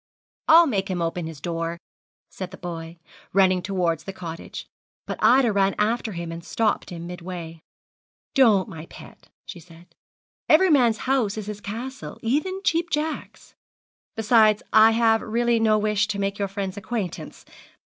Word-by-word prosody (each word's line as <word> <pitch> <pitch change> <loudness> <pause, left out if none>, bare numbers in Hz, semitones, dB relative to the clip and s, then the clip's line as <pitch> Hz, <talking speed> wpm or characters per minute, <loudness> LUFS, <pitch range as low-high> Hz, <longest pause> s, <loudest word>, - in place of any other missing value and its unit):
'I'll 330 +2 +8
make 200 -9 -1
him 185 -2 -2
open 165 0 -2
his 160 -3 -9
door,' 165 +2 -3 0.5
said 185 -2 -6
the 190 - -11
boy, 165 -1 -7 0.4
running 185 -1 +4
towards 175 -5 -1
the 195 - -5
cottage; 170 -3 -8 0.4
but - - -5
Ida 250 -2 +5
ran 195 -1 +2
after 220 +1 0
him 170 -1 -5
and 165 0 -7
stopped 220 +4 -1
him 170 -2 -7
midway. 175 -2 -8 0.7
'Don't, 225 -9 +4
my 160 0 -9
pet,' - - -14 0.2
she 175 - -9
said; 170 +1 -17 0.6
'every 355 +3 +6
man's 240 -6 +4
house 250 -6 +1
is 215 - -4
his 210 0 -7
castle, 245 +7 -7
even 310 +11 -1
Cheap 335 -1 +1
Jack's. 305 +1 -4 0.6
Besides 220 -1 +4
I 220 0 +8
have 225 0 +3
really 235 +1 +1
no 220 -1 +3
wish 210 -1 +1
to 210 -1 -3
make 200 0 -2
your 200 - 0
friend's 195 -1 -5
acquaintance. 190 -7 -5
200 Hz, 160 wpm, -24 LUFS, 175-230 Hz, 0.7 s, I'll